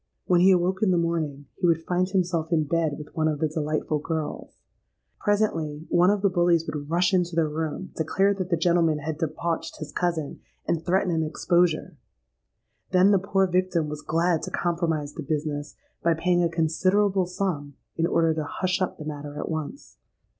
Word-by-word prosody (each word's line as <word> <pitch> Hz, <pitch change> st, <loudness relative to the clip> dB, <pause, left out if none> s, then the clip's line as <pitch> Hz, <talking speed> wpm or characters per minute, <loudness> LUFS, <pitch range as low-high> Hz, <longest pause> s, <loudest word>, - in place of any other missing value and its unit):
When 175 Hz, -1 st, +3 dB
he 185 Hz, -, +6 dB
awoke 185 Hz, 0 st, +2 dB
in 215 Hz, -, +3 dB
the 180 Hz, -, +3 dB
morning, 160 Hz, -4 st, -1 dB
he 180 Hz, -, 0 dB
would 165 Hz, -1 st, +2 dB
find 180 Hz, +2 st, 0 dB
himself 175 Hz, -4 st, 0 dB
in 160 Hz, -2 st, +3 dB
bed 160 Hz, -1 st, 0 dB
with 150 Hz, +2 st, -11 dB
one 160 Hz, -2 st, +1 dB
of 155 Hz, -1 st, 0 dB
the 155 Hz, -, +1 dB
'delightful 155 Hz, 0 st, -1 dB
girls.' 160 Hz, 0 st, -4 dB, 0.6 s
Presently, 165 Hz, -8 st, 0 dB
one 175 Hz, +2 st, +5 dB
of 205 Hz, 0 st, +1 dB
the 200 Hz, -, +5 dB
bullies 175 Hz, -2 st, +3 dB
would 145 Hz, -2 st, -5 dB
rush 180 Hz, +5 st, +2 dB
into 175 Hz, -2 st, +1 dB
the 165 Hz, -2 st, +2 dB
room, 160 Hz, +4 st, -4 dB
declare 195 Hz, +5 st, +2 dB
that 190 Hz, -2 st, -4 dB
the 170 Hz, -, +2 dB
gentleman 165 Hz, -2 st, +2 dB
had 155 Hz, +1 st, -4 dB
debauched 165 Hz, +1 st, -3 dB
'his 150 Hz, -2 st, -7 dB
cousin,' 165 Hz, -3 st, -2 dB, 0.3 s
and 165 Hz, -1 st, 0 dB
threaten 185 Hz, 0 st, +1 dB
an 160 Hz, -, +1 dB
exposure. 165 Hz, 0 st, +1 dB, 0.9 s
Then 185 Hz, +2 st, +5 dB
the 200 Hz, -, +4 dB
poor 195 Hz, 0 st, +1 dB
victim 180 Hz, -3 st, 0 dB
was 150 Hz, 0 st, -6 dB
glad 165 Hz, +2 st, +1 dB
to -, -, -5 dB
compromise 165 Hz, -4 st, -1 dB
the -, -, -6 dB
business 145 Hz, 0 st, -3 dB, 0.3 s
by 170 Hz, -1 st, +2 dB
paying 175 Hz, +2 st, +2 dB
a 170 Hz, -, +2 dB
considerable 185 Hz, +4 st, +1 dB
sum, 165 Hz, -7 st, -3 dB, 0.2 s
in 165 Hz, 0 st, +1 dB
order 165 Hz, -2 st, +2 dB
to 155 Hz, -1 st, -2 dB
hush 185 Hz, +5 st, -2 dB
up 185 Hz, -, -1 dB
the 155 Hz, -, -8 dB
matter 145 Hz, -1 st, -6 dB
at -, -, -4 dB
once. 160 Hz, -, -6 dB
165 Hz, 190 wpm, -25 LUFS, 155-180 Hz, 0.9 s, he